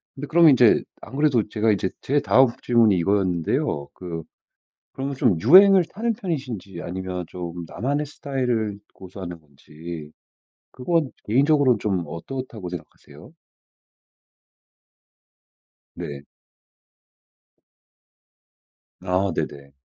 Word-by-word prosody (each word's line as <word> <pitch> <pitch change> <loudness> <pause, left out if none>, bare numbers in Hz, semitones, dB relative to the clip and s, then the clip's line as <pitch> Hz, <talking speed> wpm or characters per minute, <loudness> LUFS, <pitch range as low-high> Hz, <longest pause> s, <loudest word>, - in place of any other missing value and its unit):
근데 140 +1 -6
그러면 165 0 +6
인제 125 -4 +5 0.2
안 - - -10
그래도 135 -7 +2
제가 110 +1 +1
이제 95 -2 0
제 145 +2 +1
다음 135 -1 +4 0.2
질문이 115 -5 +4
이거였는데요. 85 -6 0
그 85 -3 -7 0.7
그러면 135 +1 -4
좀 120 - +2
유행을 190 - +7
타는 230 +6 -2
편이신지 130 - -5
아니면 90 0 -5
좀 85 -1 -7
나만의 140 - -2
스타일을 125 -8 -2
고수하는 90 -2 -9
건지 75 +2 -10 0.6
그건 155 +2 -1
개인적으로 135 +2 +3
좀 95 -4 -1
어떻다고 110 - -7
생각하세요? 85 -4 -11 2.6
네. 70 -1 -7 2.8
아 95 +1 0
네네. 70 -1 -5
105 Hz, 240 characters per minute, -23 LUFS, 90-135 Hz, 2.8 s, 유행을